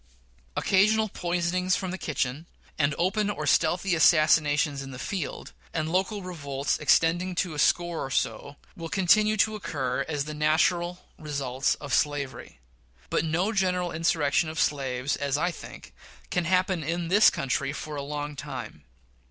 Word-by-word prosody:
Occasional 215 +3 +3
poisonings 180 +1 0
from 185 -2 -3
the 190 - -4
kitchen, 145 +1 -3 0.3
and 145 -1 +2
open 200 +4 +1
or 155 -7 -3
stealthy 175 +5 +2
assassinations 155 -3 +4
in 135 - -8
the 130 - -8
field, 190 +7 -5 0.2
and 160 -1 -1
local 190 +3 -1
revolts, 145 -6 -3
extending 175 +4 +2
to 175 -2 -1
a 150 - -5
score 175 0 +1
or 135 - -5
so, 140 +1 -2 0.2
will 165 -1 -7
continue 210 +3 +3
to 215 +1 +3
occur 135 -11 -2
as 145 -3 -1
the 155 - -6
natural 170 +4 +1
results 140 -4 -1
of 145 -3 -7
slavery; 145 - -1 0.5
but - - +1
no 170 +6 0
general 180 -3 0
insurrection 160 -1 +1
of 160 - -5
slaves, 135 -2 0
as 140 0 -1
I 175 +4 0
think, - - -11 0.4
can 180 -1 0
happen 185 -1 +1
in 165 +2 -2
this 205 +4 +7
country 135 +1 -2
for 150 +1 -6
a 145 - -3
long 145 +1 -5
time. 75 - -7
165 Hz, 155 wpm, -27 LUFS, 145-180 Hz, 0.5 s, this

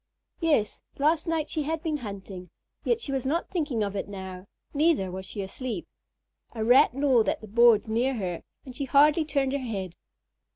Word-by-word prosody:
Yes, 295 -11 +1 0.2
last 310 +4 +2
night 320 -2 0
she 310 - -2
had 315 +2 -3
been 315 -3 -1
hunting, 195 -6 -8 0.3
yet 470 -1 +1
she 295 - -5
was 270 -2 -1
not 315 +6 -1
thinking 295 - -1
of 200 0 -3
it 195 - -3
now. 190 -1 -8 0.3
Neither 290 - +2
was 190 +1 -6
she 200 - -4
asleep. 255 - -5 0.7
A 220 -2 -3
Rat 245 +1 +5
gnawed 265 -5 +3
at - - -1
the 220 - -11
boards 235 +1 +5
near 240 +4 +1
her, 180 -6 -3 0.2
and 255 -2 -10
she 280 - -3
hardly 295 +4 +5
turned 280 -3 0
her 280 - -1
head. 200 -8 -4
255 Hz, 190 wpm, -27 LUFS, 205-300 Hz, 0.7 s, Rat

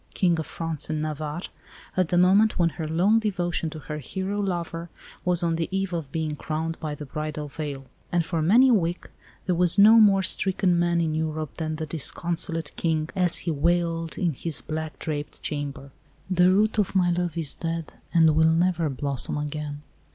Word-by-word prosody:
King 175 -3 +2
of 160 - -4
France 160 -3 -4
and 155 -1 -1
Navarre, 155 +2 -4 0.5
at 185 -2 +2
the 175 - +2
moment 195 +5 +4
when 170 -1 +3
her 160 -1 -5
long 185 +8 +3
devotion 175 -6 -1
to 155 - -8
her 150 0 -6
hero 190 +8 -3
lover 170 -3 -3 0.3
was 180 -1 +1
on 165 -1 +1
the 165 - -1
eve 195 -1 -2
of 160 -5 -4
being 160 -2 -2
crowned 160 +2 -3
by 155 -2 -4
the 150 - -8
bridal 150 +1 -4
veil; 140 -2 -6 0.3
and 175 -2 +1
for 165 -1 -1
many 230 +11 +6
a - - +5
week 175 -4 -1 0.3
there 180 - +1
was 175 0 +2
no 215 +3 +8
more 195 -3 +5
stricken 185 -2 +1
man 175 0 +2
in 160 -2 0
Europe 155 -1 -2
than 155 -1 -2
the 160 0 -4
disconsolate 165 +1 -1
King 160 -1 -1
as 180 -3 +4
he 170 - +1
wailed 165 0 0
in 170 -4 0
his 155 +3 -4
black 155 -3 -5
draped 150 -2 -4
chamber, 140 -2 -4 0.4
"The 180 0 +5
root 215 +3 +2
of 200 -1 0
my 180 -2 +3
love 175 -1 -1
is 160 -4 -1
dead, 165 -1 -4 0.2
and 160 -3 +5
will 160 +1 +5
never 170 -1 +2
blossom 140 +1 -2
again." 150 0 -4
165 Hz, 190 wpm, -25 LUFS, 155-180 Hz, 0.5 s, no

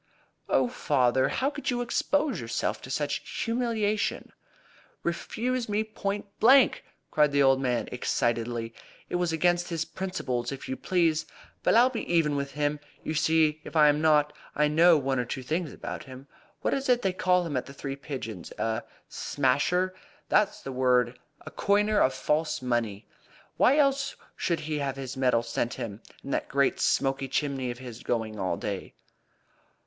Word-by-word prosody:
"Oh, - - +3
father! 130 - +2
How 275 +2 0
could 290 -1 -4
you 245 -1 0
expose 275 - 0
yourself 115 0 -2
to - - -10
such 145 +2 -2
humiliation?" 230 -3 -1 0.7
"Refused 250 0 -2
me 210 +1 +1
point 205 -2 -3
blank!" 260 +3 +6 0.3
cried 150 -1 +3
the 140 0 +4
old 135 0 +4
man 125 -3 0
excitedly. 120 -1 -1 0.4
"It - - 0
was 175 -2 0
against 175 +2 +1
his 165 -2 -2
principles, 135 -11 -3
if 135 - -7
you 130 - -2
please. 165 -2 +1 0.3
But - - +3
I'll 245 +3 +6
be 235 - -4
even 160 -4 +3
with 140 0 -3
him 145 0 0 0.2
you 155 - -3
see 155 0 +2
if 150 - -10
I 150 -1 +7
am 150 +1 +2
not. 150 -2 +4 0.2
I 150 - +3
know 165 +2 +6
one 135 -2 0
or - - +1
two 130 +2 -5
things 160 +3 -2
about - - -7
him. 130 0 -11 0.4
What - - 0
is 270 -1 -2
it 245 -1 +3
they 190 - +1
call 180 -1 +2
him 155 -4 -3
at 125 - -2
the 140 - -10
Three 135 0 -5
Pigeons? 125 - -7
A 110 0 -1 0.3
'smasher' 145 +7 +1 0.4
that's 210 -1 +2
the 135 - -5
word 125 -1 +2 0.3
a - - -8
coiner 210 +1 +2
of 130 -6 +3
false 155 +1 0
money. 120 -5 -2 0.5
Why 270 +4 +5
else 275 -2 +2 0.2
should 170 -2 -1
he 150 -1 -3
have 135 -2 -2
this 135 -1 -6
metal 125 -3 +2
sent 115 0 -2
him, 110 -1 -6 0.2
and 140 - -4
that - - -1
great 140 -1 +2
smoky 135 0 +1
chimney 135 -2 -1
of 120 - -5
his 125 -2 -9
going 110 -3 -2
all 95 -3 -1
day?" 100 -2 -5
150 Hz, 175 wpm, -28 LUFS, 130-185 Hz, 0.7 s, I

